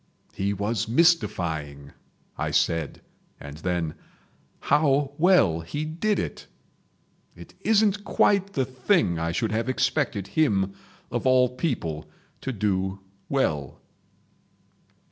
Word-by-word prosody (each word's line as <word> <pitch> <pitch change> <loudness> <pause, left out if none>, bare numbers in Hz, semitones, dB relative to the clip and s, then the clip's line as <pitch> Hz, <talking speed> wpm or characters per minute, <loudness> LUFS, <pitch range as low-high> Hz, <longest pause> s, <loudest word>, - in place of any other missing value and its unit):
"He 100 +1 -1
was 105 +3 -1
mystifying!" 85 - +1 0.4
I - - -2
said, 80 -3 0 0.4
and 70 +1 -9
then: 85 -2 -2 0.7
"How 145 -1 +2
well 175 - +4
he 100 - -4
did 170 +7 0
it!..... - - -4 0.9
It - - -13
isn't 210 -2 +2
quite 200 -1 +2
the 135 - +1
thing 130 - +1
I 85 0 -1
should 110 +6 -1
have 115 +3 -1
expected 130 -5 0
him, 100 -11 +1 0.4
of - - -1
all 130 -1 +5
people, 120 - -3 0.3
to 135 - -3
do 95 -3 -1 0.3
well." 75 - -1
115 Hz, 110 wpm, -25 LUFS, -, 0.9 s, all